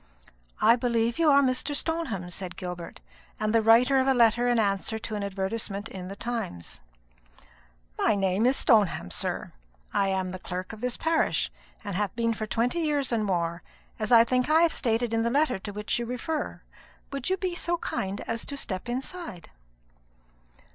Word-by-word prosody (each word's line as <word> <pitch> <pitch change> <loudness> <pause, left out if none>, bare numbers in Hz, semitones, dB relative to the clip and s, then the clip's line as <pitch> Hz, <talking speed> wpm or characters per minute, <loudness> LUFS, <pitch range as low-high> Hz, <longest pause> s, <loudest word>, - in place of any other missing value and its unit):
"I 230 +2 +6
believe 235 0 0
you 325 -2 +5
are 280 0 +6
Mr. 260 +3 0
Stoneham," 285 - -2
said 180 0 -6
Gilbert, 180 -2 -7 0.4
"and 215 0 0
the 230 - +5
writer 240 +5 +5
of 260 - +1
a 270 - +4
letter 240 0 +4
in 240 -1 +3
answer 205 0 0
to 220 0 -6
an 210 - -2
advertisement 200 +1 -3
in 185 -1 -7
the 195 - -7
Times." 225 - -5 1.2
"My - - +3
name 195 +3 +2
is 265 - +3
Stoneham, 200 - +3
sir; - - -3 0.4
I 195 - +2
am 190 -1 -1
the 185 - -6
clerk 185 +3 -5
of 220 - -10
this 250 -1 -2
parish, 325 0 +1 0.3
and 200 -3 -4
have 205 +1 -1
been 230 0 +1
for 215 -1 -4
twenty 235 - 0
years 295 -5 0
and 225 -2 +1
more, 170 -3 -1 0.4
as 215 +2 -2
I 230 -1 +9
think 250 +3 +1
I 310 - +4
may 330 - +6
have 335 - +3
stated 230 -1 0
in 225 - +2
the 230 - +1
letter 275 -3 +2
to 205 - -6
which 210 +3 -2
you 235 - -3
refer. 275 +6 -3 0.5
Will 275 0 -3
you 375 +7 0
be 370 -1 -2
so 345 0 -1
kind 195 - -3
as 230 0 -3
to 280 - -5
step 190 -4 -4
inside?" 260 - -5
230 Hz, 190 wpm, -27 LUFS, 195-255 Hz, 1.2 s, I